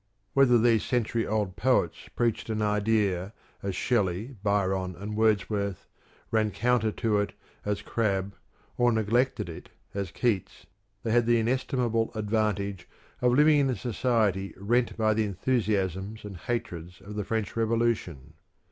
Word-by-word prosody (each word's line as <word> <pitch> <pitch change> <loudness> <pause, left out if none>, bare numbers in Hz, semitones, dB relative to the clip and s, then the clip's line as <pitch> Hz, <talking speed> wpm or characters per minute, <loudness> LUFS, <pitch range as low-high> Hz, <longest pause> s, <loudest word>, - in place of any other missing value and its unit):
Whether 135 -3 +6
these 115 -1 +3
century 115 -2 0
old 105 -4 -1
poets 125 -9 +1
preached 115 -1 0
an 110 -1 0
idea 105 -2 +1 0.3
as 100 -2 -3
Shelley, 105 +2 0
Byron, 95 -3 0
and 105 +4 -6
Wordsworth, 105 -3 0 0.4
ran 110 -1 +2
counter 115 +1 +1
to 110 -4 +1
it, 100 - -1 0.3
as 105 0 -1
Crabbe, 100 -3 -1 0.5
or 120 0 +5
neglected 115 +1 +1
it, 85 - -9 0.2
as 100 -2 -3
Keats, 105 0 -1 0.4
they 115 - -1
had 120 0 +3
the 120 0 +5
in 115 0 +1
estimable 120 -3 0
advantage 105 -3 -1 0.3
of 125 -1 +4
living 150 +1 +6
in 140 -1 +2
a 130 - 0
society 110 -5 0
rent 120 +5 +1
by 110 -1 +3
the 110 0 +1
enthusiasm 100 -2 -1
and 100 -2 -7
hatreds 90 -3 -4
of 105 - -9
the 105 0 -2
French 110 0 -2
Revolution. 115 - 0
110 Hz, 145 wpm, -28 LUFS, 100-120 Hz, 0.5 s, Whether